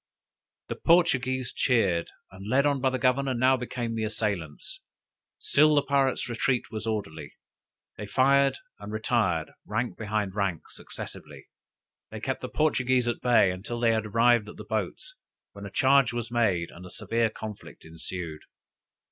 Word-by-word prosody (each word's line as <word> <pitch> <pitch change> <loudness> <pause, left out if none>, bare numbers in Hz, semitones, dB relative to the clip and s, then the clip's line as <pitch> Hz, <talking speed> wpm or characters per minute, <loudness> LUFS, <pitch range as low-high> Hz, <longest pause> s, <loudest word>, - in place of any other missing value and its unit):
The - - -4
Portuguese 130 -7 +2
cheered, 95 -9 +1 0.2
and 95 +2 -10
led 140 +4 +3
on 140 -2 +1
by 130 - +3
the 130 - -2
governor, 130 +1 +1
now 130 +2 +4
became 120 -2 -4
the 110 -1 -2
assailants. 100 -8 -4 0.6
Still 150 +1 +4
the 145 - +3
pirates' 135 -2 +1
retreat 120 +1 -1
was 110 0 -5
orderly; 80 -9 -4 0.6
they 105 - -6
fired 135 +4 +3 0.2
and 105 - -8
retired 110 -7 0
rank 120 +4 -3
behind 105 -3 -2
rank 95 -5 -1
successively. 70 -3 -10 0.6
They - - -7
kept - - -3
the - - -5
Portuguese 130 -5 +1
at 120 - -2
bay 120 -6 +4
until 100 +6 -5
they 115 -1 +3
had 110 -1 0
arrived 115 0 +3
at - - -10
the - - -8
boats, - - -4 0.4
when 100 0 -9
a - - -8
charge 135 +2 +4
was 120 0 -4
made 100 -8 +1
and 90 - -12
a 90 - -10
severe 115 +4 0
conflict 110 -1 -9
ensued. 80 0 -7
115 Hz, 155 wpm, -27 LUFS, 100-130 Hz, 0.6 s, now